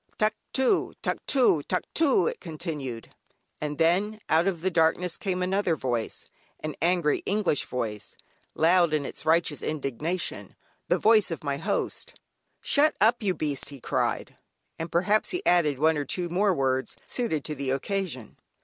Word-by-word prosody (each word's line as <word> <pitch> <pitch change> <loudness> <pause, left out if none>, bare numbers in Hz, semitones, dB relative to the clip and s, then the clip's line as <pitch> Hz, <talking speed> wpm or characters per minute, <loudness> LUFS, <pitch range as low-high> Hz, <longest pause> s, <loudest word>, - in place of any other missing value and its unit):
"Tuctoo, 255 - 0
tuctoo, 250 - +2
tuctoo," 190 - +1
it - - -2
continued. 150 - -6 0.5
And 150 -1 -3
then, 195 +6 +2
out 165 +4 +3
of 175 -4 -1
the 190 +2 0
darkness 170 +1 +2
came 185 -4 -2
another 185 -2 +1
voice, 120 -5 -3 0.3
an 155 -1 -4
angry 170 -3 +2
English 200 -7 +1
voice, 110 -5 -4 0.4
loud 170 -1 +4
in 145 -2 -1
its 155 - -7
righteous 160 -2 +2
indignation, 155 +4 -3 0.3
the - - +3
voice 215 -3 +4
of 165 - -5
my 140 -1 -1
host. 160 - -3 0.4
"Shut 295 +2 +3
up 230 +4 +4
you 195 -4 0
beast," 145 -3 -2
he 140 -2 -10
cried, - - -2 0.4
and 165 +1 -4
perhaps 195 +5 +2
he 360 +2 -3
added 155 -6 +3
one 160 +2 +3
or 145 - -2
two 175 +5 -3
more 195 +4 +2
words 130 -5 -1
suited 195 - -2
to 155 - -3
the 140 -2 -4
occasion. 140 - -3
165 Hz, 150 wpm, -27 LUFS, 145-195 Hz, 0.5 s, loud